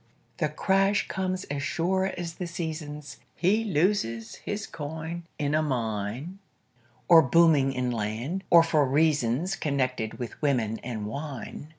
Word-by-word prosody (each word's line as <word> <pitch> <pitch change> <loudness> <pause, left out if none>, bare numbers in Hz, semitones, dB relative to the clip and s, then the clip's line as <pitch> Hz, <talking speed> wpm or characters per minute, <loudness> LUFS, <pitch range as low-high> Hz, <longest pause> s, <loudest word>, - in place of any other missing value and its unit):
The - - 0
crash 195 +1 +2
comes 185 0 -2
as 145 -4 -4
sure 190 +6 0
as 170 -2 -4
the 180 +1 -5
seasons; 155 -3 -5 0.2
He 200 +7 +2
loses 150 - 0
his 205 +1 -4
coin 160 +3 -6
in 145 0 -1
a 155 - +3
mine, 120 - -3 0.7
Or 165 -2 +9
booming 150 -1 +4
in 125 -2 -1
land, 120 - -3
or 170 -1 +8
for 160 -3 +3
reasons 145 +3 +2
Connected 130 -6 -1
with 120 -3 -7
women 120 -7 +1
and 115 -4 -5
wine. 140 +4 -6
150 Hz, 135 wpm, -27 LUFS, 125-175 Hz, 0.7 s, Or